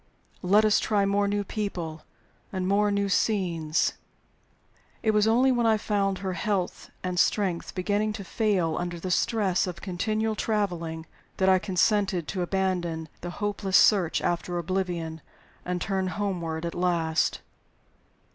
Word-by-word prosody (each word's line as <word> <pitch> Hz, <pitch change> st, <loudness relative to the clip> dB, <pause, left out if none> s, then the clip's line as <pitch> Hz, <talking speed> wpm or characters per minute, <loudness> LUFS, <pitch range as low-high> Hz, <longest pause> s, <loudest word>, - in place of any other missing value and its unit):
Let 205 Hz, +4 st, +4 dB
us 215 Hz, -, +4 dB
try 205 Hz, -2 st, +1 dB
more 200 Hz, +1 st, +2 dB
new 205 Hz, 0 st, 0 dB
people 175 Hz, -7 st, -4 dB, 0.5 s
and 185 Hz, -1 st, -2 dB
more 205 Hz, +2 st, +3 dB
new 200 Hz, 0 st, +1 dB
scenes." 175 Hz, -4 st, +1 dB, 1.1 s
It 220 Hz, -, +3 dB
was 210 Hz, 0 st, +3 dB
only 250 Hz, +4 st, +4 dB
when 240 Hz, -2 st, +2 dB
I 220 Hz, -1 st, +4 dB
found 200 Hz, -2 st, 0 dB
her 185 Hz, 0 st, -3 dB
health 190 Hz, -1 st, -2 dB
and 180 Hz, -1 st, -1 dB
strength 185 Hz, -2 st, +1 dB
beginning 205 Hz, +3 st, 0 dB
to 205 Hz, -2 st, -6 dB
fail 185 Hz, -7 st, 0 dB
under 175 Hz, -1 st, -4 dB
the 185 Hz, +2 st, -4 dB
stress 190 Hz, -2 st, +1 dB
of 175 Hz, -2 st, -5 dB
continual 215 Hz, +4 st, -1 dB
traveling 175 Hz, -7 st, -2 dB, 0.3 s
that 190 Hz, 0 st, +3 dB
I 190 Hz, 0 st, +5 dB
consented 190 Hz, -2 st, +1 dB
to 190 Hz, -, -2 dB
abandon 175 Hz, -3 st, -1 dB
the 175 Hz, -, -5 dB
hopeless 200 Hz, 0 st, 0 dB
search 190 Hz, -6 st, +4 dB
after 175 Hz, 0 st, -1 dB
oblivion, 170 Hz, -2 st, -2 dB, 0.4 s
and 180 Hz, 0 st, -2 dB
to -, -, -3 dB
turn 190 Hz, -1 st, 0 dB
homeward 175 Hz, -5 st, -3 dB
at 170 Hz, -, -3 dB
last. 170 Hz, -3 st, 0 dB
190 Hz, 145 wpm, -27 LUFS, 175-205 Hz, 1.1 s, I